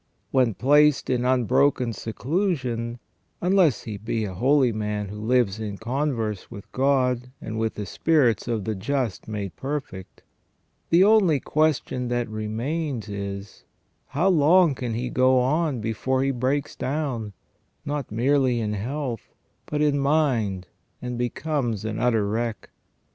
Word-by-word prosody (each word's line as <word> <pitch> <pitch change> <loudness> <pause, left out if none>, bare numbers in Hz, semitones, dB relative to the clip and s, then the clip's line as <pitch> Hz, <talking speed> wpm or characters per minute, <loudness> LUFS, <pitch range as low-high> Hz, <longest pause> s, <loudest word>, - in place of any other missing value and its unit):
When 125 -6 +2
placed 145 +4 +4
in 125 -1 0
unbroken 125 0 +2
seclusion, 120 - -2 0.4
unless 180 - +3
he 110 -3 -5
be 110 +1 -2
a 95 - -5
holy 130 +5 +3
man 105 -2 -3
who 105 +1 -7
lives 110 -3 +1
in 105 -2 -4
converse 115 -4 -2
with 100 - -11
God 125 -2 +1
and 110 0 -5
with 110 0 -1
the 105 - -4
spirits 120 - +2
of 115 -4 -1
the 110 - -2
just 115 - -2
made 100 -6 -5
perfect, 135 - -6 0.7
the 170 +3 +6
only 195 -8 +5
question 150 -4 0
that 120 0 -1
remains 115 +3 -3
is, 100 0 -6 0.4
how 170 +8 +1
long 170 0 +5
can 120 -3 -4
he 125 +2 -3
go 130 0 +4
on 140 0 +1
before 130 +4 0
he 135 - +1
breaks 135 +3 -1
down, 130 -7 -3 0.5
not 145 -5 -3
merely 130 +2 +2
in 105 -2 -1
health, 120 +2 -4 0.3
but 150 0 0
in 145 -1 +2
mind 130 -10 +1 0.3
and 125 0 -5
becomes 120 -3 -2
an 110 0 -3
utter 115 -4 +2
wreck. 115 +1 -3
125 Hz, 140 wpm, -24 LUFS, 110-145 Hz, 0.7 s, the